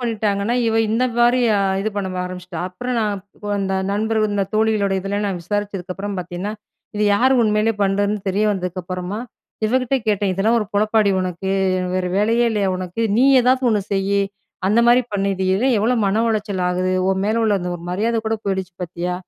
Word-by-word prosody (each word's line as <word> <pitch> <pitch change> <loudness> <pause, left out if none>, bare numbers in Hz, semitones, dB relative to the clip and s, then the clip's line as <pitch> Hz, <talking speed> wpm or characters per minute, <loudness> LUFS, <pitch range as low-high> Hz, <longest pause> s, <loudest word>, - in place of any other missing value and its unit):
பண்ணிட்டாங்கன்னா, 215 -2 -1
இவ 225 - +1 0.2
இந்த 235 +3 +2
மாதிரி 240 +1 +4 0.2
அ - - +2 0.2
இது 220 +2 -1
பண்ண 195 -2 -1 0.2
ஆரம்பிச்சிட்டா, 180 -1 -7
அப்புறம் 245 +7 -4
நான் 205 -3 -2 0.4
அந்த 195 -1 -1 0.2
நண்பர்கள், 215 0 0
இந்த 200 -1 +1
தோழிகளோட 215 -2 +2
இதில 200 +2 -2
நான் 190 -3 -2
விசாரித்ததுக்கப்புறம் 200 0 -4
பார்த்தீங்கன்னா, 180 +3 -4 0.4
இது 210 - +1
யாரு 260 +5 +3
உண்மலேயே 215 +1 +2
பண்ணுறதுன்னு 200 +1 +1
தெரிய 205 +3 +1
வந்ததுக்கு 185 -2 -3
அப்புறமா, 180 +3 -4 0.5
இவகிட்ட 255 +3 +1
கேட்டேன். 205 -2 +1
"இதெல்லாம் 215 +5 +2
ஒரு 210 - -2
பொழப்பாடி 215 0 +2
உனக்கு! 185 +1 -3 0.4
வேறு 185 -1 0
வேலையே 230 +3 +2
இல்லையா 205 -3 0
உனக்கு? 185 +3 -5 0.2
நீ 250 - +4 0.2
ஏதாவது 255 +2 +2
ஒன்னு 210 -2 +2
செய். 200 +1 +1 0.5
அந்த 215 +4 +4
மாதிரி 245 +1 +5
பண்ணு. 200 0 0
இது 190 0 -2
எ - - +2 0.2
எவ்ளோ 230 +4 +2
மன 215 +4 +1
உளைச்சல் 205 -4 -1
ஆகுது, 185 +1 0 0.2
உன் 190 0 0
மேல 220 +2 +1
உள்ள 215 - +2
அந்த 180 - -3
ஒரு 170 - -13
மரியாத 225 +5 0
கூட 225 0 0
போயிடுச்சு 190 -2 -2
பார்த்தியா?" 175 +1 -3
205 Hz, 175 wpm, -20 LUFS, 190-220 Hz, 0.5 s, மாதிரி